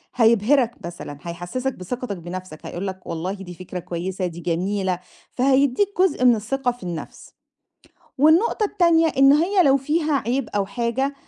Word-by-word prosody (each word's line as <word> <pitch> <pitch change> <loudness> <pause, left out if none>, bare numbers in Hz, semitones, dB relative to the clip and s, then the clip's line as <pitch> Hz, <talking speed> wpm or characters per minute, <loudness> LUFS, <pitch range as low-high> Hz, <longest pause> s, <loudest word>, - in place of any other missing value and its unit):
هيبهرك 235 +2 +3
مثلًا، 170 -4 -7
هيحسِّسك 175 - -4
بثقتك 205 +3 -5
بنفسك، 175 -1 -8
هيقول 190 +3 -4
لك 190 -1 -7
والله 170 +4 -3
دي 195 -3 -9
فكرة 180 +1 -7
كويسة، 180 +2 -4
دي 170 -1 -8
جميلة، 185 +2 -1 0.3
فهيديك 275 +7 +2
جزء 370 -9 +2
من 245 -2 +7
الثقة 245 +4 -1
في 245 -5 -13
النَفْس، 170 -3 -7 0.9
والنقطة 335 - +4
التانية 340 -4 +3
إن 275 +1 +7
هي 355 +6 +3
لو 275 -3 +5
فيها 300 +3 0
عيب 250 +1 -1
أو 200 -1 +1
حاجة، 245 +5 -1
235 Hz, 150 wpm, -22 LUFS, 180-275 Hz, 0.9 s, من